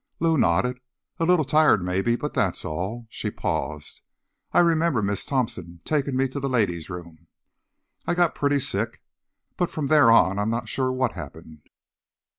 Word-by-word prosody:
Lou 165 0 +2
nodded. 125 - +1 0.4
"A 165 - +1
little 175 -3 +3
tired, 150 - +4
maybe, 95 +6 0
but 150 +4 -4
that's 95 -5 -1
all." 95 +10 -4
She - - -3
paused. 75 +1 -4 0.5
"I - - 0
remember 165 -8 +3
Miss 100 0 -2
Thompson 90 -10 -3
taking 140 -3 0
me 135 +1 +2
to 140 - -5
the 135 0 -2
ladies' 95 -10 0
room. 85 -3 -9 0.8
I - - +1
got 175 -2 +2
pretty 145 -1 +1
sick. - - -2 0.5
But 175 - 0
from 155 - -3
there 150 -6 +6
on, 100 -3 +4
I'm 105 +2 0
not 115 -1 -2
sure 130 +2 -1
what 130 -2 0
happened." 80 -2 -11
120 Hz, 165 wpm, -24 LUFS, 90-145 Hz, 0.8 s, there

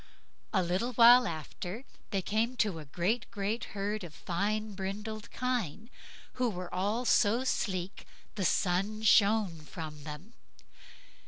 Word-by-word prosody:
A 190 -4 +2
little 185 +9 -1
while 240 +1 +8
after 175 - -6 0.2
they 195 -2 -1
came 230 +6 0
to 200 -8 +1
a 155 - -9
great, 190 - -1
great 205 +3 -2
herd 205 +1 -2
of 160 -3 -9
fine 210 +4 -2
brindled 205 +3 -5
kine, 235 - -2 0.5
who 250 - +3
were 180 -3 -6
all 210 +6 0
so 230 +2 +4
sleek 190 -7 -2 0.3
the 205 - -3
sun 195 +5 +1
shone 205 -5 +4
from 150 -2 -8
them. 155 +9 -9
205 Hz, 135 wpm, -31 LUFS, 180-225 Hz, 0.5 s, while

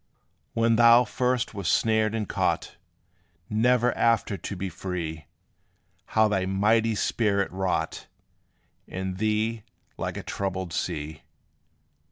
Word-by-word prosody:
When 115 0 +3
thou 120 +1 +7
first 125 +1 -1
was 100 -4 -4
snared 110 +1 +2
and 110 -3 -2
caught, - - -1 0.8
Never 120 +2 +3
after 115 -3 +2
to 100 - -6
be 95 +1 -3
free, 85 -4 -5 0.9
How 110 0 +6
thy 95 -3 0
mighty 110 +3 +2
spirit 100 -2 0
wrought 95 -1 -2 0.8
In 95 0 -4
thee, 110 +2 0 0.4
like - - -4
a - - -5
troubled 95 -3 -3
sea! 80 -4 -3
105 Hz, 115 wpm, -26 LUFS, 95-115 Hz, 0.9 s, thou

